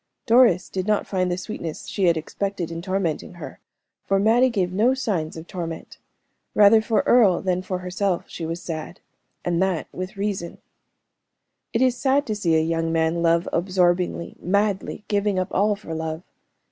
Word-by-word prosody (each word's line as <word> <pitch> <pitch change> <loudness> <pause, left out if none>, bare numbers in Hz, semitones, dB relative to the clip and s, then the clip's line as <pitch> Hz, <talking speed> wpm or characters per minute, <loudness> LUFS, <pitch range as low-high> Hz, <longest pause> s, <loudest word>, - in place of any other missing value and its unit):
Doris 230 -6 +5
did 185 +1 -4
not 210 -1 +1
find 185 -2 -1
the 175 - -1
sweetness 175 -4 -6
she 195 - -1
had 170 -2 +4
expected 180 +2 -3
in 165 0 -5
tormenting 185 -2 -2
her, 175 - -9 0.4
for 195 - +1
Mattie 230 +6 +4
gave 185 -6 -1
no 230 +7 +3
signs 180 -12 -2
of 160 - -8
torment 165 -3 -7 0.6
rather 210 +1 +7
for 220 0 +1
Earle 215 -8 +4
than 185 -1 0
for 185 0 -3
herself 180 0 -1
she 170 - -7
was 165 +2 -4
sad, 160 +1 -6 0.5
and 175 0 +1
that 190 -4 0
with 185 +1 -6
reason. 195 -4 -3 1.1
It 235 +2 +2
is 255 -2 +3
sad 275 +3 +1
to 215 - -2
see 170 -6 +1
a 160 - +4
young 165 0 -1
man 165 +1 +1
love 170 +1 +2
absorbingly, 175 -1 0
madly, 200 +2 0
giving 205 -1 0
up 185 0 -1
all 205 +2 +2
for 200 -5 -8
love. 160 +1 -4
185 Hz, 170 wpm, -23 LUFS, 170-205 Hz, 1.1 s, rather